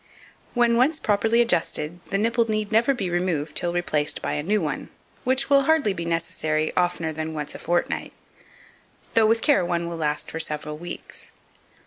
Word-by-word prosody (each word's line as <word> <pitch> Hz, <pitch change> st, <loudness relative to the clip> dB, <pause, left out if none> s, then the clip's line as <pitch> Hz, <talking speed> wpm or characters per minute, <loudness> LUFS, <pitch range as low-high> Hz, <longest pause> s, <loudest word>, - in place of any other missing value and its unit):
When 235 Hz, -1 st, +4 dB
once 280 Hz, +6 st, +3 dB
properly 220 Hz, +3 st, +2 dB
adjusted, 170 Hz, -6 st, 0 dB
the 195 Hz, -, 0 dB
nipple 230 Hz, +2 st, +1 dB
need 215 Hz, 0 st, -1 dB
never 230 Hz, +5 st, +4 dB
be 195 Hz, -9 st, -2 dB
removed 175 Hz, -4 st, -1 dB
till 175 Hz, -, +1 dB
replaced 155 Hz, -4 st, 0 dB
by -, -, -3 dB
a -, -, -1 dB
new 205 Hz, +7 st, +1 dB
one, 150 Hz, -6 st, -3 dB, 0.4 s
which 260 Hz, +2 st, +2 dB
will 275 Hz, -1 st, +4 dB
hardly 310 Hz, -10 st, +3 dB
be 170 Hz, -3 st, -5 dB
necessary 155 Hz, -2 st, -1 dB
oftener 175 Hz, -3 st, 0 dB
than 160 Hz, +1 st, -4 dB
once 150 Hz, -1 st, -4 dB
a -, -, -8 dB
fortnight, 175 Hz, +1 st, -1 dB, 1.0 s
though 225 Hz, -1 st, +5 dB
with 225 Hz, +1 st, +2 dB
care 290 Hz, -, +4 dB
one 170 Hz, -1 st, -1 dB
will 170 Hz, -1 st, -5 dB
last 150 Hz, -2 st, -2 dB
for 160 Hz, -, -4 dB
several 150 Hz, -1 st, -3 dB
weeks. 175 Hz, +1 st, -8 dB
175 Hz, 175 wpm, -24 LUFS, 160-230 Hz, 1.0 s, though